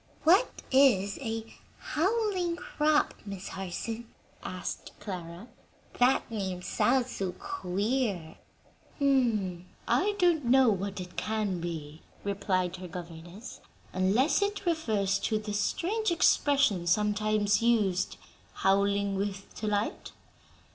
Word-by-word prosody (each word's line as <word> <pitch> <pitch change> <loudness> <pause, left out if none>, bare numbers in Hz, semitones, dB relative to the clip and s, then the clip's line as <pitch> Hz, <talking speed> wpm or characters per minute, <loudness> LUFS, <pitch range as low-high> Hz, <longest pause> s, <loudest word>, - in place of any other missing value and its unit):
"What 375 +10 +3
is 235 -8 +4
'a 225 -3 -3 0.3
howling 370 0 0
crop,' 305 -3 +1
Miss 195 -2 -7
Harson?" 220 +5 -5 0.3
asked 185 0 -6
Clara. 180 0 -7 0.5
"That 250 0 +3
name 190 -4 -3
sounds 255 +4 +1
so 190 -2 -3
queer!" 205 - -2 0.6
"I 240 - +1
don't 345 -7 +3
know 260 0 +5
what 195 0 -3
it 180 -1 -8
can 215 -4 -1
be," 160 -2 -6 0.2
replied 185 -2 -1
her 180 0 -7
governess, 175 +4 -9 0.3
"unless 205 - +2
it 405 -1 -1
refers 215 - +1
to 215 - 0
the 210 -1 -5
strange 370 - 0
expression 280 - +3
sometimes 210 +2 +2
used, 210 -6 +2 0.4
'howling 200 +1 +2
with 195 0 -4
delight.' 210 -1 -2
210 Hz, 105 wpm, -29 LUFS, 190-265 Hz, 0.6 s, know